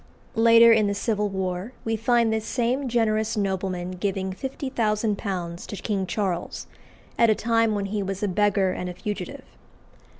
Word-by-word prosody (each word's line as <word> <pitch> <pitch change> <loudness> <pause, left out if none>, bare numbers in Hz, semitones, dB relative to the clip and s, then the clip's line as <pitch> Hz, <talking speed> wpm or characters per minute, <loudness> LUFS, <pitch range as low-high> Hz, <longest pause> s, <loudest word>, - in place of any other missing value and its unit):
Later 230 0 +7
in 215 -2 +3
the 200 - -1
Civil 210 0 0
War 190 +3 -3
we 225 0 0
find 230 0 +2
this 220 -1 -1
same 255 +2 0
generous 220 -1 +1
nobleman 190 -2 -2
giving 190 0 -2
£50,000 210 -8 -2
to - - -6
King 195 -1 -2
Charles, 180 -2 -2 0.5
at 230 - +6
a 215 - +4
time 230 -1 +2
when 200 -1 -1
he 205 +1 -2
was 195 +1 -4
a - - +2
beggar 195 0 +2
and 180 0 -4
a 180 - -7
fugitive. 205 +3 -5
210 Hz, 160 wpm, -25 LUFS, 190-225 Hz, 0.5 s, Later